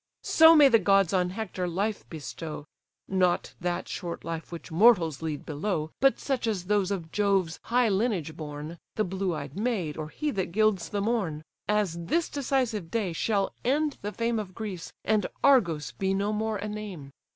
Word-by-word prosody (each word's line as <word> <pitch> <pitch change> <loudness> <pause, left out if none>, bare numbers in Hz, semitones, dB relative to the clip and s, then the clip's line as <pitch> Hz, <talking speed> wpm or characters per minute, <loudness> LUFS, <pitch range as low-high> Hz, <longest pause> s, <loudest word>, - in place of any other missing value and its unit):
So 320 +1 +7
may 295 -2 +8
the 230 -4 +5
gods 195 -2 +3
on 180 -1 +2
Hector 185 -2 -4
life 200 +5 -2
bestow, 155 0 -7 0.4
(Not 185 -2 +1
that 175 0 -2
short 175 -3 -5
life 165 0 -5
which 170 -1 -8
mortals 170 - +4
lead 155 -3 -4
below, 155 0 -2
But 270 0 +4
such 260 -4 -1
as 195 -5 -1
those 200 -1 +1
of 175 -5 -4
Jove's 195 -5 +1
high 245 0 +3
lineage 195 -7 0
born, 150 +1 -7 0.2
The 215 - +1
blue 190 -2 -2
eyed 145 -1 -6
maid, 200 -8 -1
or 155 -1 -5
he 300 - -2
that 190 -6 -3
gilds 215 -4 +2
the 205 -1 -2
morn,) 200 -9 -1 0.2
As 200 -5 0
this 335 - +1
decisive 250 - -1
day 205 -5 -1
shall 200 +3 0
end 290 +3 +1
the 205 - -3
fame 230 +1 -1
Of 190 -3 -7
Greece, 200 -7 -6
and 215 -1 +2 0.2
Argos 175 - +4
be 195 0 -1
no 200 +2 0
more 220 0 -1
a 205 +1 -4
name. 205 -10 -7
195 Hz, 180 wpm, -28 LUFS, 165-220 Hz, 0.4 s, may